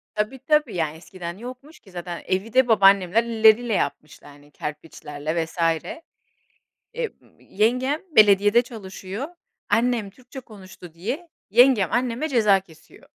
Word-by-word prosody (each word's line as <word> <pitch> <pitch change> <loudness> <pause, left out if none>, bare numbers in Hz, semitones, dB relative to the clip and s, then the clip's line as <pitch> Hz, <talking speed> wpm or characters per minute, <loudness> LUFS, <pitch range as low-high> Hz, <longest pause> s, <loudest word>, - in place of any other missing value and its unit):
Tabii, 215 +5 -2
tabii. 295 -3 +1
Ya, 160 -3 -1
eskiden 175 +1 -9
yokmuş 255 +7 -11
ki 195 - -20
zaten 175 -1 -7
evi 195 +4 -2
de 260 -1 +4
babaannemler 200 -1 +4
elleriyle 225 0 +3
yapmışlar, 145 -4 -4
hani, 145 +1 -19
kerpiçlerle 150 +1 -5
vs. 160 - -16 1.4
Eee, 485 -2 -3 0.3
yengem 250 +8 0 0.2
belediyede 205 +2 +6
çalışıyor, 210 +1 -8 0.4
annem 230 -3 +1
Türkçe 255 +5 -12
konuştu 190 -7 -14
diye 245 - -5 0.2
yengem 235 -4 +4
anneme 245 +4 -1
ceza 210 -8 +3
kesiyor. 165 -4 -20
210 Hz, 125 wpm, -23 LUFS, 180-245 Hz, 1.4 s, belediyede